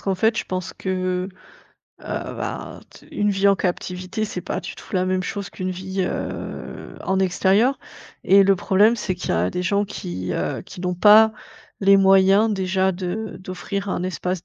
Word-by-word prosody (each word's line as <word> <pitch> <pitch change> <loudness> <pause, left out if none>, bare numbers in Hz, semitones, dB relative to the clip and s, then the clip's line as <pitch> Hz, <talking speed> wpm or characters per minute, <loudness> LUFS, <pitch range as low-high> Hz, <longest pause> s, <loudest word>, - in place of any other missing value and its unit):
qu'en 195 - -1
fait, 220 +4 +2
je - - -2
pense 185 -1 -4
que, 185 -1 -2 0.7
heu, - - -5
ben, - - -5
t - - -17
une 205 0 +1
vie 195 0 +1
en 200 - +4
captivité, 185 +2 -3
c'est 195 -4 -5
pas - - -4
du - - -7
tout - - -11
la 185 -1 +2
même 185 0 0
chose 200 +1 -5
qu'une 185 0 -4
vie, 190 +1 -4
heu, - - -5
en 190 0 +1
extérieur 195 +7 +2 0.5
et 200 +1 +6
le 195 0 +4
problème, 205 +6 +3
c'est 195 -4 -2
qu'il 180 - -5
y - - +2
a 85 +2 +1
des 180 - -3
gens 200 +2 +1
qui, 90 - -5
heu, - - -2
qui - - -11
n'ont 180 0 -1
pas 215 +4 +7 0.5
les 195 0 +6
moyens 195 +2 +5
déjà 190 -1 +1
de 185 +4 -4
d'offrir 190 +2 -5
un 180 - -2
espace 180 -1 -3
190 Hz, 185 wpm, -22 LUFS, 185-200 Hz, 0.7 s, pas